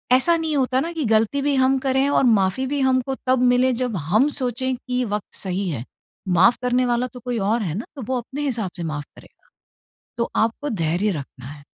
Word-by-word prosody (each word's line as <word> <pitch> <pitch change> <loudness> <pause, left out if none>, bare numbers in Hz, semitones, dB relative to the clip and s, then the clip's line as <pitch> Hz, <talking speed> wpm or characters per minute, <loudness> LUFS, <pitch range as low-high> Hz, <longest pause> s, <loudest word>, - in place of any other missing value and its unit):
ऐसा 335 +7 +4
नहीं 320 -2 -2
होता 260 -1 +1
ना 330 +5 -2
कि 320 -4 -2
गलती 225 +5 +2
भी 285 0 +1
हम 260 0 +3
करें 265 +1 +2
और 285 - +3 0.2
माफ़ी 195 +8 0
भी - - -1
हमको 260 0 +1
तब 255 0 +3
मिले 255 +1 +3
जब 250 -4 -1 0.2
हम 225 +8 +4
सोचे 260 +1 -1
कि 250 0 -3
वक़्त 210 - -7
सही 190 0 -2
है। 130 -7 -4 0.5
माफ़ 190 +7 +5
करने 250 0 +2
वाला 240 +1 +1
तो 250 - -9
कोई 245 -1 -3
और 215 +4 +1
है 170 -6 -2
ना 225 - -4
तो 275 - -7
वो 260 - 0
अपने 265 +5 -7
हिसाब 230 -9 -1
से 175 - -4
माफ़ 150 -3 -4
करेगा। - - -19 0.7
तो 235 - -1
आपको 230 +6 0
धैर्य 180 - 0
रखना 135 -6 -7
है। 145 +1 -11
245 Hz, 215 wpm, -22 LUFS, 200-265 Hz, 0.7 s, माफ़